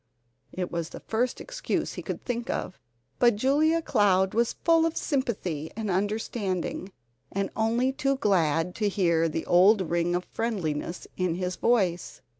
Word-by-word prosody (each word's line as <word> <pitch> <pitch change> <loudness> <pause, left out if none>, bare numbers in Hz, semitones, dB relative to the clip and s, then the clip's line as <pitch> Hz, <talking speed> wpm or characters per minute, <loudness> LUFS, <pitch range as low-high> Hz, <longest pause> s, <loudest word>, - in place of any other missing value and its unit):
It 180 -1 -4
was 170 -1 -3
the - - -9
first 240 +3 -1
excuse - - -3
he - - -6
could - - -6
think 240 +1 -3
of. 185 - -3 0.4
But 240 -3 +5
Julia 305 +8 +2
Cloud 190 -6 +3
was 235 +1 +1
full 330 -1 +5
of 330 - -4
sympathy 195 - -2
and 215 -2 -2
understanding, 195 -1 -2 0.4
and 195 0 -2
only 230 +4 +1
too 275 0 0
glad 180 - +1
to 210 -2 +1
hear 170 -4 +2
the 160 +1 -3
old 185 +1 +4
ring 175 0 +1
of 180 - -2
friendliness 180 -7 -3
in 180 -3 0
his 180 0 -2
voice. 185 -7 0
200 Hz, 155 wpm, -27 LUFS, 175-240 Hz, 0.4 s, But